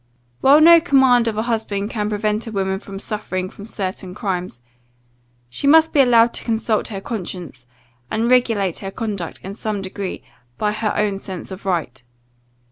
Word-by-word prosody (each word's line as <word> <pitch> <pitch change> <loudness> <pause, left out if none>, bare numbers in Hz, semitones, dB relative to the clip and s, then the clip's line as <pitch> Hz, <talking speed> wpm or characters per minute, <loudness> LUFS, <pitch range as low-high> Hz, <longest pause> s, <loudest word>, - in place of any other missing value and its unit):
While 285 +3 +6
no 335 +1 +8
command 265 -7 +4
of 220 -2 -2
a 220 - 0
husband 220 -3 -2
can 210 -2 -2
prevent 210 +1 -1
a - - -5
woman 190 -2 -1
from 195 -1 -9
suffering 185 -3 -4
for 205 - -11
certain 185 -3 -5
crimes, 180 - -4 0.8
she 125 - -3
must 320 +2 +6
be 290 - +3
allowed 235 -2 +5
to - - -6
consult 225 -1 0
her 200 -3 -5
conscience, 180 - -6 0.4
and 225 +2 0
regulate 225 -8 +2
her 195 - -5
conduct, 200 -4 -5
in 195 - -6
some 215 0 -3
degree, 195 0 -5 0.3
by 210 -1 0
her 215 0 -2
own 205 -2 0
sense 190 -1 -7
of 190 +1 -8
right. 160 -9 -2
210 Hz, 170 wpm, -20 LUFS, 190-230 Hz, 0.8 s, no